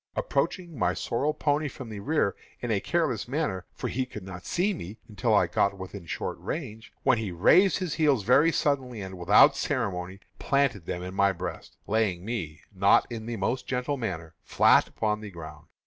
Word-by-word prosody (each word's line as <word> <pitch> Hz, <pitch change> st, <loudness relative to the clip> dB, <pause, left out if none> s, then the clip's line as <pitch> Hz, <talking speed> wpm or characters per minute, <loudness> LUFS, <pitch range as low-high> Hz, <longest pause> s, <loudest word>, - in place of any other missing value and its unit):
Approaching 175 Hz, -, -2 dB
my -, -, +1 dB
sorrel 140 Hz, +6 st, -1 dB
pony 150 Hz, 0 st, 0 dB
from 130 Hz, -3 st, -8 dB
the 105 Hz, -2 st, -6 dB
rear, 125 Hz, -3 st, 0 dB, 0.2 s
in 120 Hz, -, -3 dB
a 105 Hz, -, +2 dB
careless 145 Hz, -6 st, -1 dB
manner, 120 Hz, -, -2 dB
for -, -, -4 dB
he 130 Hz, +1 st, -2 dB
could 105 Hz, -5 st, -8 dB
not 90 Hz, -1 st, -9 dB
see 195 Hz, +4 st, +1 dB
me 105 Hz, -, -8 dB
until 105 Hz, -4 st, -1 dB
I -, -, +5 dB
got 100 Hz, 0 st, +1 dB
within 95 Hz, -1 st, -8 dB
short -, -, -4 dB
range, 115 Hz, -8 st, -6 dB
when 120 Hz, -, +3 dB
he 105 Hz, -4 st, -3 dB
raised 180 Hz, -, +5 dB
his 180 Hz, -5 st, -3 dB
heels 145 Hz, -9 st, +2 dB
very 140 Hz, +9 st, +5 dB
suddenly, 130 Hz, -7 st, 0 dB
and, 95 Hz, -1 st, -7 dB
without 90 Hz, +3 st, +6 dB
ceremony, 95 Hz, -8 st, -2 dB, 0.2 s
planted 135 Hz, -11 st, +1 dB
them 90 Hz, -, -3 dB
in 90 Hz, 0 st, -6 dB
my 100 Hz, 0 st, +3 dB
breast, 85 Hz, -, -7 dB
laying 100 Hz, -5 st, 0 dB
me, 85 Hz, -10 st, -4 dB
not 100 Hz, +1 st, +4 dB
in 115 Hz, -1 st, -6 dB
the 120 Hz, -1 st, -3 dB
most 120 Hz, +6 st, -2 dB
gentle 125 Hz, +3 st, -1 dB
manner, 85 Hz, -, -5 dB
flat -, -, +4 dB
upon 105 Hz, -1 st, -2 dB
the 105 Hz, -, -7 dB
ground. 80 Hz, -3 st, -10 dB
110 Hz, 190 wpm, -27 LUFS, 95-140 Hz, 0.2 s, without